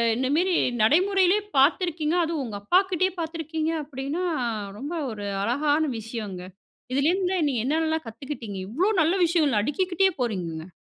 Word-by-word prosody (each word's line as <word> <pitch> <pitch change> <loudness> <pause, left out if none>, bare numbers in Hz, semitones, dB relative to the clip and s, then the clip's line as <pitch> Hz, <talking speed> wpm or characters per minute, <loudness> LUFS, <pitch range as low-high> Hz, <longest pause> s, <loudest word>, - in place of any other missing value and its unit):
இந்தமேரி 295 +9 +1 0.3
நடைமுறையிலேயே 375 - +4 0.2
பாத்துருக்கீங்க, 315 +2 +2
அதுவும் 320 -3 -2
உங்க 215 -4 -5
அப்பாகிட்டயே 370 - +2
பாத்துருக்கீங்க, 320 -1 -2
அப்படின்னா 285 +4 -4 0.5
ரொம்ப 285 +9 -5 0.2
ஒரு 205 -2 -6 0.2
அழகான 290 +7 +1 0.2
விஷயங்க. 215 -4 -6 0.5
இதுலேருந்து 360 +7 +1
நீங்க 245 -5 -1
என்னென்னலாம் 315 +1 0
கத்துக்கிட்டிங்க 225 -3 -6
இவ்வளோ 340 - +1
நல்ல 320 +3 +3
விஷயங்கள் 310 -9 +2
அடிக்கிக்கிட்டயே 370 - +1
போறீங்கங்க. 175 -8 -3
305 Hz, 115 wpm, -25 LUFS, 235-345 Hz, 0.5 s, நடைமுறையிலேயே